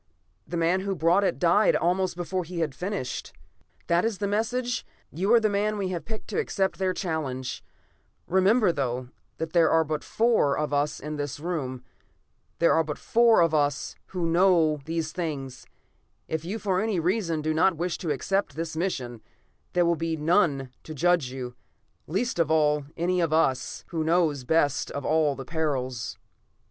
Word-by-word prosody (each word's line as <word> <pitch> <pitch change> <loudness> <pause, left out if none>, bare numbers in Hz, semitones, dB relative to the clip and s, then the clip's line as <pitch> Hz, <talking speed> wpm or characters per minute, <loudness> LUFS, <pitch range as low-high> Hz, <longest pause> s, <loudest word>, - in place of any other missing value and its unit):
The 175 - -3
man 170 +3 +2
who 195 0 -2
brought 170 +5 +3
it - - +1
died 180 +4 +4
almost 180 +1 +1
before 180 +1 -2
he 170 0 -5
had 155 -4 -1
finished. 180 -3 -4 0.5
"That 170 +1 +2
is 225 -3 -1
the 205 - -2
message. 240 +4 -1 0.3
You 190 +8 -1
are - - +7
the 220 - +2
man 210 +1 0
we 195 -2 -2
have 175 -2 -4
picked 220 -1 -7
to - - -1
accept 195 - -1
their 190 -1 +1
challenge. 155 -9 -3 0.6
Remember, 190 +3 +3
though, 125 -4 -2 0.3
that 160 0 -4
there 170 -2 +5
are 160 0 +4
but 155 -1 -3
the - - -15
four 225 -11 +2
of 150 -1 -2
us 145 +1 0
in 150 +1 -5
this 145 -1 -4
room. 140 -7 -3 0.7
There 170 - +4
are 160 - +3
but 150 -2 -5
four 230 -2 +4
of 165 -1 +3
us 145 -1 0
who 180 -3 -3
know 165 -3 +3
these 160 -1 -2
things. 145 -7 -5 0.6
If 160 0 -3
you 190 +6 -3
for 190 -4 0
any 215 -4 0
reason 170 -3 0
do 155 0 0
not 170 +2 +3
wish 175 0 -2
to 170 - -4
accept 195 +8 -1
this 160 0 -4
mission, 130 - -3 0.5
there 175 -1 +3
will 170 0 +3
be 165 0 -2
none 150 -5 +2
to 155 - -9
judge 170 -3 +2
you, 125 -1 -6 0.5
least 195 - -1
of 165 -2 +2
all, 150 -2 +2
any 180 +2 +1
one 175 - +3
of 155 - -3
us, 135 -5 +1
who 165 -2 -2
know 165 -1 +3
best 145 -4 +2
of 140 - -5
all 155 -2 +2
the 135 - -7
perils." 130 - -2
165 Hz, 185 wpm, -26 LUFS, 150-185 Hz, 0.7 s, are